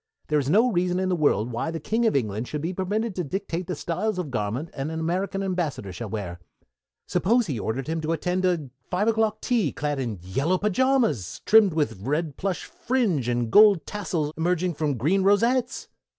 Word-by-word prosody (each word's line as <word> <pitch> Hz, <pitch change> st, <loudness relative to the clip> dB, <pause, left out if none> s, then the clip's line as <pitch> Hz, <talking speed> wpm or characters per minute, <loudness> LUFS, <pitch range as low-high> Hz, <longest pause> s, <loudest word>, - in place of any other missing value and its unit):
There 150 Hz, -1 st, +3 dB
is 140 Hz, -1 st, -2 dB
no 225 Hz, +9 st, +4 dB
reason 180 Hz, -1 st, +1 dB
in 185 Hz, 0 st, 0 dB
the 180 Hz, -, +2 dB
world 125 Hz, -, +1 dB
why 120 Hz, +7 st, -2 dB
the 165 Hz, 0 st, -4 dB
King 225 Hz, +9 st, +1 dB
of 220 Hz, -, +1 dB
England 110 Hz, -2 st, -1 dB
should 150 Hz, 0 st, -4 dB
be 175 Hz, +3 st, -2 dB
permitted 205 Hz, +4 st, -1 dB
to 180 Hz, -, -2 dB
dictate 180 Hz, +2 st, -4 dB
the 180 Hz, -, -2 dB
style 175 Hz, +8 st, -2 dB
of 160 Hz, -6 st, -4 dB
garments 120 Hz, +8 st, -2 dB
an 140 Hz, +2 st, -3 dB
American 180 Hz, +5 st, -2 dB
Ambassador 165 Hz, -, -2 dB
shall 105 Hz, +5 st, -6 dB
wear. 95 Hz, -5 st, -5 dB, 0.7 s
Suppose 235 Hz, +5 st, +2 dB
he 140 Hz, -, -3 dB
ordered 115 Hz, +6 st, -2 dB
him 160 Hz, +1 st, -2 dB
to 155 Hz, +1 st, -2 dB
attend 180 Hz, +3 st, -1 dB
a 170 Hz, -8 st, 0 dB, 0.2 s
five 190 Hz, +4 st, 0 dB
o'clock 220 Hz, -1 st, +1 dB
tea 225 Hz, -, +1 dB
clad 145 Hz, -1 st, -2 dB
in 115 Hz, -6 st, -3 dB
yellow 140 Hz, -, 0 dB
pajamas 210 Hz, -, +1 dB
trimmed 210 Hz, -6 st, +5 dB
with 115 Hz, -11 st, -1 dB
red 150 Hz, +5 st, -1 dB
plush 190 Hz, -4 st, -3 dB
fringe 210 Hz, -, 0 dB
and 120 Hz, -2 st, -1 dB
gold 205 Hz, -, +6 dB
tassels 170 Hz, -7 st, -3 dB
emerging 175 Hz, +2 st, 0 dB
from 145 Hz, -3 st, -1 dB
green 165 Hz, -, +2 dB
rosettes? 235 Hz, +6 st, +2 dB
170 Hz, 195 wpm, -25 LUFS, 140-195 Hz, 0.7 s, gold